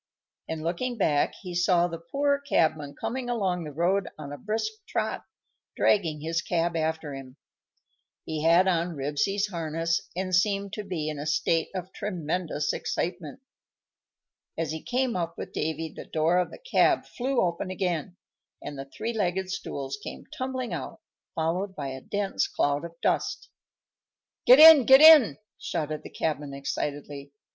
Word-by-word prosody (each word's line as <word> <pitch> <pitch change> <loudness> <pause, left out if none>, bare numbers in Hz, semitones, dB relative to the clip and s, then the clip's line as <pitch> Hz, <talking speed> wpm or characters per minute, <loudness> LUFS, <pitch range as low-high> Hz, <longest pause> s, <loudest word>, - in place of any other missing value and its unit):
and, 160 -1 -4
looking 230 +9 -2
back, 150 -8 +1
he 180 -2 -6
saw 175 0 +3
the 165 -1 -6
poor 280 +11 0
cabman 155 - 0
coming 250 0 -3
along 190 -7 -1
the 150 - -7
road 180 +5 +1
on 145 -2 -7
a - - -6
brisk 220 - -2 0.2
trot, - - -2 0.5
dragging 165 -7 +2
his 165 +1 -1
cab 170 0 -1
after 160 -2 -2
him. 135 0 -10 0.9
He 155 -1 -3
had 170 +3 +5
on 170 -1 0
Ribsy's 150 +9 -1
harness, 165 -1 -1
and 185 0 -3
seemed 200 +1 +1
to 210 - -4
be 175 -6 -4
in 150 -2 -4
a 150 - -4
state 165 +1 +1
of 185 0 -5
tremendous 165 -5 -2
excitement. 175 - -4 1.2
As 165 -2 -2
he 160 0 -5
came 255 -1 -1
up 170 -2 -3
with - - -7
Davy 160 +1 -3
the - - -8
door 165 +3 +1
of 180 - 0
the - - -11
cab - - +2
flew 260 +1 -2
open 175 +1 -1
again, 180 -2 -2 0.4
and 145 -1 -7
the 135 - -5
three 225 +12 -5
legged 190 -3 -1
stools 140 -8 -5
came - - -8
tumbling 255 -4 -3
out, 140 -6 -6 0.4
followed 180 +5 -1
by 140 -4 -4
a 130 0 -7
dense 200 +3 -1
cloud 145 +1 0
of 170 0 -11
dust. - - -1 1.0
"Get 255 - +10
in! 310 -5 +10
Get 265 0 +9
in!" 310 -7 +9 0.2
shouted 155 -2 -3
the - - -10
cabman, 150 -3 -3
excitedly. 140 0 -5
170 Hz, 160 wpm, -27 LUFS, 155-200 Hz, 1.2 s, Get